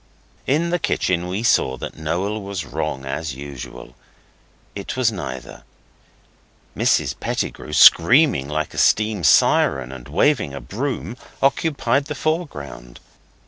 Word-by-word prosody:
In 160 +5 +1
the 175 - +1
kitchen 90 - 0
we 95 +5 -3
saw 65 - +2
that - - -7
Noel 90 +7 -2
was 100 -3 -5
wrong 65 0 -4
as 70 +1 -4
usual. 70 -3 -9 0.8
It 100 +5 -6
was 125 -3 +2
neither. 65 - -7 1.1
Mrs - - +1
Pettigrew, - - -4
screaming 85 - +6
like 75 +1 -3
a - - -3
steam 105 -3 +2
siren 65 -3 +3
and 65 -3 -10
waving 70 - +1
a - - -5
broom, 125 - -4 0.2
occupied 140 -2 +1
the 150 -1 -5
foreground. 75 - -4
95 Hz, 125 wpm, -21 LUFS, -, 1.1 s, screaming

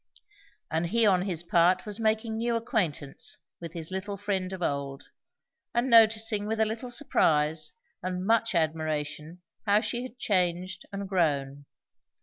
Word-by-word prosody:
And 165 +2 0
he 230 +5 +3
on 185 -3 +4
his 175 -3 -3
part 175 +2 +3
was 210 0 -5
making 220 0 0
new 235 +1 0
acquaintance 185 - -2 0.2
with 170 -1 -7
his 165 0 -6
little 195 +2 -4
friend 190 -2 -2
of 185 -2 -5
old, 140 -2 -2 0.7
and 240 +2 +1
noticing 220 -2 +5
with 220 +1 -2
a 220 - +4
little 225 +3 -4
surprise 160 - +1 0.3
and 185 0 -3
much 225 -1 +2
admiration 155 +1 -2 0.2
how 205 +1 +5
she 240 +1 -2
had 255 -1 -8
changed 185 -5 0
and 200 0 -4
grown. 145 -6 0
185 Hz, 145 wpm, -28 LUFS, 160-220 Hz, 0.7 s, noticing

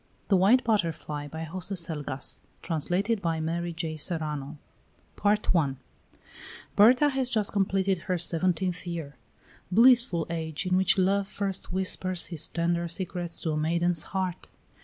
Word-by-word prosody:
THE 200 - +5
WHITE 210 +8 +5
BUTTERFLY 165 -9 -1
By 160 +2 -6
Jose 185 +4 -4
Selgas 150 -6 -2 0.2
Translated 185 +7 -1
by 165 -3 -1
Mary 170 +2 -2
J. 160 -1 -4
Serrano. 150 -3 -3 0.6
THE - - -18
WHITE 210 +1 +2
BUTTERFLY 145 -6 +1 1.0
Berta 250 +8 +6
has 265 -2 -1
just 215 -4 +1
completed 195 -1 +1
her 180 +1 -2
seventeenth 175 +1 0
year. 165 -5 -5 0.6
Blissful 235 -5 +5
age 160 0 -3
in 180 0 +1
which 190 +1 +4
Love 195 +1 +2
first 195 -3 -4
whispers 185 -1 0
his 165 -4 -3
tender 170 0 0
secrets 175 0 -5
to 160 - 0
a 155 - -1
maiden's 170 +2 +1
heart! 185 -2 -3
175 Hz, 140 wpm, -27 LUFS, 160-195 Hz, 1.0 s, Berta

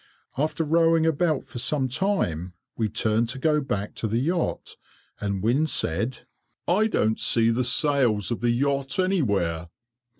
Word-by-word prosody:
After 155 +4 -1
rowing 165 +1 +3
about 160 -2 +1
for 120 - -7
some 135 +1 0
time, 105 - -1 0.2
we 110 -2 -1
turned 110 +2 0
to 130 - -2
go 150 +2 +1
back 105 -7 -3
to 110 - -2
the 110 +2 -1
yacht, 165 +7 -2 0.4
and 100 -2 -3
Wynne 130 +8 +2
said, 115 - 0 0.5
"I 210 +5 +3
don't 110 - 0
see 115 -1 +3
the 125 +2 0
sails 125 - +1
of 120 - -2
the 120 - 0
yacht 135 +2 0
anywhere. 100 - 0
130 Hz, 155 wpm, -25 LUFS, 110-155 Hz, 0.5 s, rowing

